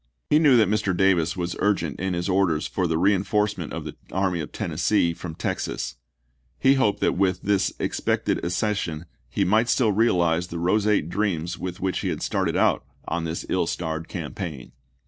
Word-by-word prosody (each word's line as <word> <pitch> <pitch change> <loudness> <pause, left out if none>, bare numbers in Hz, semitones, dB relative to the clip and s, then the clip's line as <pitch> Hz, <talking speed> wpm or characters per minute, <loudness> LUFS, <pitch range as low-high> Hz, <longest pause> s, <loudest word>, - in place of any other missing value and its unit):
He 150 - +6
knew 145 -6 +6
that 110 -3 +5
Mr. 100 -3 0
Davis 90 -3 +2
was 85 -1 -2
urgent 95 -7 0
in 95 0 -1
his 85 +2 -2
orders 90 -5 +2
for 90 -2 -1
the 80 -1 0
reenforcement 100 0 +1
of - - -4
the - - -7 0.2
Army 95 -2 0
of 75 - -5
Tennessee 85 +2 +1
from 80 -1 -7
Texas; - - -3 0.6
he 135 - +4
hoped 105 -7 +1
that - - +3
with 95 -1 +1
this 100 -2 +2
expected - - -1
accession 90 -3 -1 0.2
he 100 +9 0
might 110 +6 +3
still 115 -5 +3
realize 90 -6 +2
the 85 - -6
roseate 100 0 +2
dreams 90 -3 -2
with 90 -1 -5
which 95 -1 0
he - - -3
had - - -2
started - - 0
out - - +2 0.2
on 85 -1 -2
this 80 +1 -4
ill 90 -3 0
starred 80 -1 -3
campaign. 85 - -6
90 Hz, 180 wpm, -24 LUFS, 85-105 Hz, 0.6 s, He